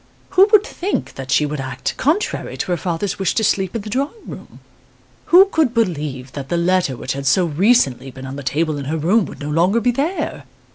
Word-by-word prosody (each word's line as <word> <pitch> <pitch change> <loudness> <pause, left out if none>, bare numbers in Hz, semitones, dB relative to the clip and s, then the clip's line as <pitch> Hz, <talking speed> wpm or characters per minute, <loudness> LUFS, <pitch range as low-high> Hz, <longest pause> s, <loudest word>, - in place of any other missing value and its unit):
Who 385 +2 +5
would 425 -2 +6
think 390 -3 -3
that 135 -1 -8
she 150 - +3
would 150 0 -4
act 130 -1 -4
contrary 325 +9 -1
to - - -3
her 175 - +1
father's 180 +4 -3
wish 190 -3 0
to 220 - +1
sleep 195 -2 0
in 225 - -3
the 215 - -7
drawing 280 - -3
room? - - -11 0.7
Who 365 +3 +7
could 315 - 0
believe 150 - -2
that 135 -1 -7
the 175 - 0
letter 175 -6 +1
which 130 - -3
had 140 0 -4
so 180 +7 +3
recently 160 - +2
been 130 +1 -10
on 135 +1 -6
the 140 - -6
table 150 +2 -1
in 140 - -6
her 155 +4 -2
room 185 +7 +2
would - - -11
no 145 +1 -4
longer 180 +8 +2
be 245 +2 +2
there? 295 +10 -3
175 Hz, 225 wpm, -19 LUFS, 140-235 Hz, 0.7 s, Who